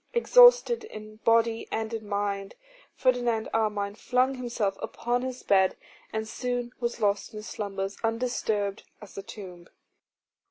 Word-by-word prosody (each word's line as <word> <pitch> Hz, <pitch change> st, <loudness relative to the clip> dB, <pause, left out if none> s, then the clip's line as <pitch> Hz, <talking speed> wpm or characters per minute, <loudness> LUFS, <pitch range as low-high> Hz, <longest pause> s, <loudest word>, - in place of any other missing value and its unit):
Exhausted -, -, +6 dB
in 215 Hz, -, -10 dB
body 230 Hz, 0 st, +2 dB
and 220 Hz, +1 st, -2 dB
in 220 Hz, -2 st, -5 dB
mind, 200 Hz, -1 st, -2 dB, 0.4 s
Ferdinand 245 Hz, -3 st, +1 dB
Armine 210 Hz, -2 st, 0 dB
flung 250 Hz, +4 st, +1 dB
himself 235 Hz, -6 st, -2 dB
upon 245 Hz, +1 st, -2 dB
his 255 Hz, 0 st, -5 dB
bed, 190 Hz, -1 st, +3 dB, 0.3 s
and 220 Hz, 0 st, -3 dB
soon 245 Hz, +1 st, -3 dB
was 235 Hz, -1 st, -2 dB
lost 205 Hz, 0 st, 0 dB
in 210 Hz, -, -6 dB
slumbers 200 Hz, -2 st, -4 dB
undisturbed 225 Hz, -3 st, -1 dB, 0.2 s
as 210 Hz, -, -13 dB
the 195 Hz, -, -6 dB
tomb. 185 Hz, -4 st, -10 dB
220 Hz, 130 wpm, -27 LUFS, 205-245 Hz, 0.4 s, Exhausted